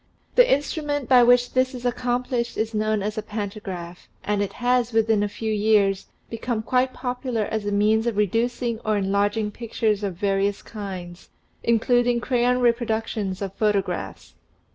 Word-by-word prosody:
The - - +5
instrument 290 -1 -1
by 255 -2 +7
which 245 0 +4
this 255 0 +1
is 245 0 -8
accomplished 245 0 -1
is 220 +1 -1
known 215 -1 0
as 210 +1 -2
a - - -2
pantagraph, 195 -5 -6 0.2
and 205 -1 0
it 200 - -2
has, 245 -1 +1
within 225 -1 +3
a 205 - 0
few 220 +1 -3
years, 205 -2 +2 0.2
become 230 0 -3
quite 255 +3 +1
popular 250 -3 -3
as 210 0 -3
a - - 0
means 215 +3 +2
of 230 -3 -1
reducing 230 +3 0
or 215 -2 0
enlarging 205 +2 0
pictures 215 -2 -1
of 195 -3 -2
various 200 +1 0
kinds, 185 -5 -8 0.3
including 240 +1 +2
crayon 250 0 +1
reproductions 225 -5 0
of 195 -1 -5
photographs. 205 -3 -2
220 Hz, 155 wpm, -24 LUFS, 205-245 Hz, 0.3 s, by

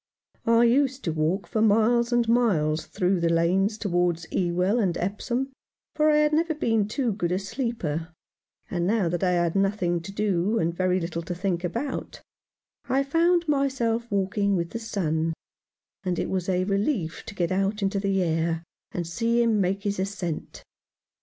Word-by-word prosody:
I 230 +1 +5
used 265 +2 +2
to 165 - -1
walk 160 +5 0
for 215 +5 -1
miles 225 +3 +3
and 240 -1 +2
miles 175 -11 +2
through 185 -2 0
the 170 0 +1
lanes 185 +6 +2
towards 175 -5 0
Ewell 180 +5 +1
and 185 -6 +1
Epsom; 240 +8 -2 0.4
for 305 0 +3
I 300 - +4
had 300 0 +3
never 320 +1 +1
been 225 -7 +1
too 240 +2 -1
good 175 -4 -2
a 180 - +1
sleeper, 195 - -3 0.6
and 175 -1 -1
now 205 -4 +2
that 175 +2 -2
I 180 -1 +3
had 175 -1 +1
nothing 195 -3 +1
to 165 - -8
do 200 +1 0
and 165 -4 0
very 185 +1 +1
little 170 -1 -3
to 175 +1 -5
think 180 -1 -1
about, 235 +11 -4 0.7
I 270 +1 +2
found 335 +4 +2
myself 265 -5 0
waking 200 0 +1
with 170 -2 -2
the 230 - -4
sun, 165 -8 -1 0.7
and 180 -2 -1
it - - -2
was 185 -1 -1
a 185 0 +2
relief 200 - -1
to 205 - -8
get 175 -2 -1
out 195 +2 0
into 195 +1 0
the 195 -1 +1
air 165 0 0 0.3
and 175 - -3
see 230 +7 +1
him 220 -3 +2
make 195 +2 0
his 200 -2 -1
ascent. 190 -4 -4
195 Hz, 175 wpm, -26 LUFS, 175-230 Hz, 0.7 s, I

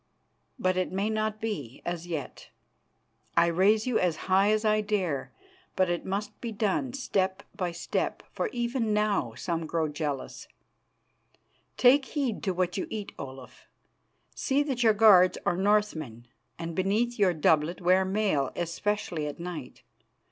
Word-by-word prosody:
But 185 -6 +1
it 185 - 0
may 200 +3 -1
not 215 0 -1
be 180 - -5
as 175 0 -4
yet. 160 -5 -6 0.9
I - - +6
raise 195 +6 +3
you 250 -3 +1
as 180 -3 +1
high 195 +2 +4
as 215 +1 +1
I 215 0 +3
dare, 190 -9 -1 0.4
but 185 -2 +2
it 175 - -3
must 205 +2 -4
be 235 - -4
done 215 +4 -1
step 195 -7 -1
by 180 -4 -2
step, 170 - -2
for - - -2
even 240 - -1
now 200 - 0
some 165 +4 -3
grow 160 0 0
jealous. 145 -2 -4 1.3
Take 265 +2 +6
heed 265 -6 -2
to 190 - +1
what 180 0 -1
you - - -2
eat, 210 -2 -5
Olaf. 130 -2 -10 0.7
See 280 +2 +1
that 265 -4 -2
your 225 -2 +5
guards 200 -4 +6
are 175 - +2
Northmen, 180 - 0 0.3
and 165 0 -5
beneath 210 +7 0
your 185 -4 +3
doublet 155 +2 +2
wear 185 +1 +4
mail, 190 -8 0
especially 175 -2 -2
at 145 - -7
night. 170 -7 -7
190 Hz, 150 wpm, -28 LUFS, 170-215 Hz, 1.3 s, I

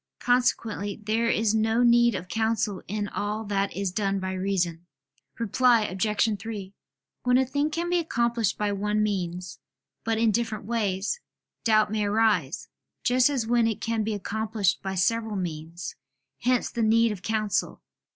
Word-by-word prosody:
Consequently 225 -5 0
there 225 +2 +1
is 220 -1 +2
no 220 +2 +2
need 235 -1 +5
of 180 -1 -5
counsel 220 -1 0
in 205 +1 -2
all 210 +2 -3
that 200 -1 -1
is 195 -2 -1
done 195 0 0
by 190 0 -3
reason. 180 -3 -1 0.5
Reply 235 +1 +3
Obj. 210 +2 0
3: 200 -2 -6 0.5
When 250 0 +3
a 265 - +3
thing 285 +3 0
can 335 +3 -2
be 350 0 +2
accomplished 235 - 0
by 210 -1 0
one 210 +1 0
means, 180 -3 -3 0.4
but 225 0 0
in 225 0 +3
different 225 -2 -2
ways, 210 - -1 0.4
doubt 215 -2 +3
may 215 -1 0
arise, 205 -8 +1 0.4
just 255 +1 +4
as 265 -6 -1
when 235 0 +3
it 225 - -2
can 225 -1 -1
be 215 0 -1
accomplished 210 -1 -1
by 190 0 -3
several 220 +3 +1
means: 165 -2 -5 0.5
hence 250 0 +1
the 235 - -2
need 225 +1 +4
of 200 -3 -6
counsel. 215 0 -1
215 Hz, 160 wpm, -26 LUFS, 195-230 Hz, 0.5 s, need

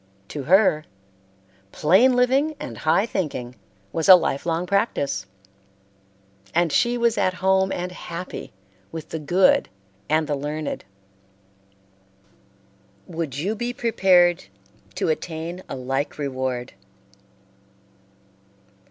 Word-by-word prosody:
To 145 - -5
her, 185 -4 +4 0.9
"plain 200 +12 +4
living 265 +5 +2
and 290 - -6
high 160 +6 +2
thinking" 145 - -3 0.4
was 165 +4 0
a 185 - +13
life 165 -4 -1
long 165 +1 0
practice, 145 - -1 1.3
and 170 -1 +2
she 240 +9 +2
was 235 -1 +1
at 185 - +1
home 190 +1 +2
and 180 +1 -3
happy 180 0 -7 0.4
with 160 -2 -7
the 160 - -4
good 175 +5 +3 0.4
and 155 +1 +2
the 150 - -2
learned. 150 -1 -4 2.2
Would 160 -6 -5
you 185 +9 -1
be 240 +2 -3
prepared 180 - +3 0.5
to - - -1
attain 165 +2 -4
a - - -4
like 135 +2 -3
reward? 130 -3 -3
175 Hz, 110 wpm, -23 LUFS, 150-195 Hz, 2.2 s, a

